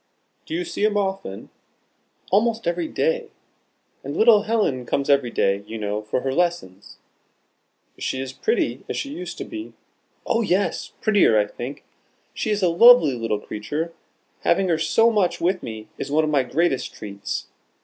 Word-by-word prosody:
"Do 320 - -3
you 355 +1 -2
see 345 -11 -4
them 210 -1 +2
often?" 190 - -3 0.8
"Almost 225 +3 +2
every 170 -1 -1
day. 485 -1 -1 0.7
And - - -5
little 220 -2 +6
Helen 210 - 0
comes 140 +3 0
every 140 -3 +3
day, 100 -3 0
you 115 - -6
know, 105 0 -2
for 110 +4 -2
her 135 0 -2
lessons." 170 - -2 1.0
"Is - - -10
she 130 - -2
as 135 0 -5
pretty 450 - -1
as - - -3
she 280 - -4
used 175 -8 -6
to - - -5
be?" 330 -1 -8 0.5
"Oh 230 - +1
yes 200 -2 -1
prettier, 205 - +4
I 105 - +3
think. 120 +6 -8 0.5
She 220 - -3
is 205 -2 0
a - - +5
lovely 175 - +7
little 115 -3 -2
creature: 145 +12 -4 0.5
having 185 +2 +2
her 160 -2 +2
so 225 +9 +3
much 205 -5 +1
with 180 +2 0
me 110 -2 -7
is - - -4
one 155 +2 +2
of 155 - 0
my 145 -2 +3
greatest 135 +2 -1
treats. 100 -1 -5
170 Hz, 170 wpm, -23 LUFS, -, 1.0 s, lovely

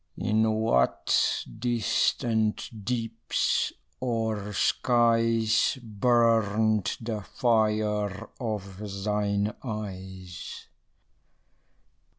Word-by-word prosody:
In 110 0 +2
what 110 - +2 0.2
distant 115 -2 0
deeps 115 -2 0 0.3
or 110 -4 -2
skies 115 +2 +2
Burnt 110 -2 +2
the 110 -2 -4
fire 105 -3 0
of 105 -5 -4 0.2
thine 105 0 0
eyes? 95 -6 -7
110 Hz, 60 wpm, -27 LUFS, 105-115 Hz, 0.3 s, In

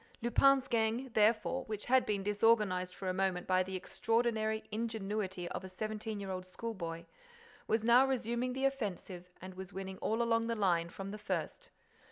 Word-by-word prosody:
Lupin's 270 +3 +4
gang, 230 +3 0
therefore, 220 +4 +3
which 215 -1 -5
had 260 +1 +4
been 200 -2 0
disorganized 205 -3 +2
for 190 - -6
a 185 - +1
moment 185 -1 0
by 185 0 +3
the 190 +1 -3
extraordinary 220 +3 0
ingenuity 210 -4 -2
of - - -5
a 190 - -7
seventeen 215 +2 -4
year 195 -1 -5
old 185 0 -5
schoolboy, 185 -5 -5 0.6
was 220 0 +1
now 245 +3 +6
resuming 250 -1 -1
the 265 +1 -1
offensive 195 -8 -3
and 185 0 -7
was 190 +1 -9
winning 190 0 -6
all 225 +2 0
along 230 -1 +2
the 230 - 0
line 175 -5 +2
from 195 +2 -7
the 210 - -7
first. 485 - -4
215 Hz, 175 wpm, -34 LUFS, 190-230 Hz, 0.6 s, now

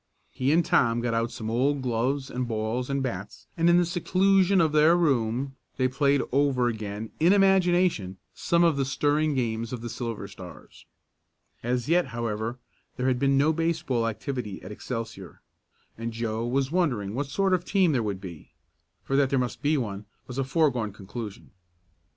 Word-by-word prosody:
He 130 +2 0
and 165 +1 +3
Tom 115 -1 +3
got 120 -1 -1
out 115 +1 0
some 110 -1 -5
old 135 +4 +1
gloves 130 +3 -1
and 125 0 -2
balls 115 +3 -2
and 140 -1 -1
bats, 105 -5 -5
and 165 +1 +3
in 170 - +6
the 175 - +4
seclusion 190 +2 +3
of 160 -3 +3
their 155 +3 +5
room 135 -4 0 0.2
they 130 - +2
played 140 +1 +2
over 135 -2 +2
again, 110 -1 -4
in 170 +4 +5
imagination, 180 - +3 0.2
some 170 0 +1
of 165 -4 +3
the 140 - +1
stirring 145 +3 +1
games 115 -2 -2
of 125 -3 -5
the 120 -1 -5
Silver 115 -5 -5
Stars. 90 -3 -13 0.7
As 125 0 -1
yet, 170 +1 +3
however, 115 -1 -3 0.4
there 125 +1 0
had 125 -1 0
been 135 0 +3
no 150 +3 +3
baseball 160 -7 0
activity 115 -3 -4
at 95 - -8
Excelsior, 110 - -7 0.6
and 115 0 -3
Joe 115 0 -2
was 135 +2 0
wondering 125 - 0
what 140 +4 -2
sort 195 +6 +1
of 180 -1 +1
team 190 -3 +2
there 130 -5 +1
would 100 -3 -3
be, 85 -5 -10 0.5
for 135 - -2
that 140 -1 +3
there 135 - +1
must 125 -2 -2
be 150 +1 +2
one 105 -5 -4 0.2
was 125 +1 -6
a - - +2
foregone 135 -6 +1
conclusion. 105 +2 -8
130 Hz, 180 wpm, -26 LUFS, 115-150 Hz, 0.7 s, in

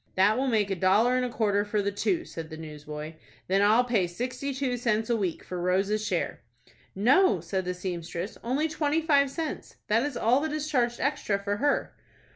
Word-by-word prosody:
"That 200 +3 +4
will 265 +3 0
make 215 -5 +1
a - - +1
dollar 205 +7 +3
and 255 - +1
a 250 - -1
quarter 205 -3 +1
for 210 0 -1
the 200 0 0
two," 335 - -1
said 160 -1 -7
the 160 - -8
newsboy. 150 0 -7 0.3
"Then 195 +2 +2
I'll 215 +4 +5
pay 225 -7 +1
sixty 250 +9 -4
two 260 -2 -1
cents 225 -1 0
a - - +3
week 190 -7 -2
for 180 -1 -5
Rose's 195 +4 +1
share." 185 -5 -2 0.5
"No," 240 - +4
said 185 +3 -3
the 180 0 -2
seamstress,—"only 185 - -3
twenty 310 0 0
five 280 -3 +4
cents. 315 +2 -5
That 220 +2 +4
is 285 0 -2
all 245 +4 +3
that 310 +1 -2
is 305 0 -2
charged 240 -5 0
extra 270 -8 0
for 200 +1 -2
her." 285 +5 0
215 Hz, 200 wpm, -27 LUFS, 190-265 Hz, 0.5 s, I'll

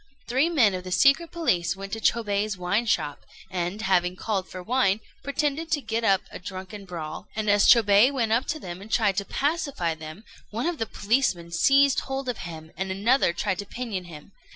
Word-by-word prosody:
Three 260 +7 +2
men 245 - +4
of 180 -1 -4
the 185 - -7
secret 275 - +4
police 175 - 0
went 195 0 -8
to 225 - -2
Chôbei's 210 -3 0
wine 200 +6 0
shop, 145 -8 -1 0.3
and, 185 +3 -3
having 180 -2 +2
called 195 -1 -2
for 185 - -8
wine, 220 -2 +2 0.2
pretended 295 +3 -1
to 300 - +2
get 225 -3 -3
up 195 -3 +3
a - - -8
drunken 190 +2 -8
brawl; 165 -4 -7
and 215 -1 -2
as 205 0 +4
Chôbei 220 +1 +6
went 235 -5 -1
up 235 +5 +2
to 310 - -2
them 180 -6 -7
and 215 +2 -11
tried 205 -5 +2
to 200 - 0
pacify 280 - -1
them, 160 +5 -10 0.3
one 230 +6 -3
of 345 -2 -2
the 225 - -1
policemen 200 -8 0
seized 275 +9 +4
hold 270 0 -4
of 245 - -3
him, 160 -1 -10
and 190 +2 -3
another 205 +4 +2
tried 180 +2 -2
to 205 - -4
pinion 220 -7 -5
him. 160 +1 -12
205 Hz, 200 wpm, -25 LUFS, 185-255 Hz, 0.3 s, Chôbei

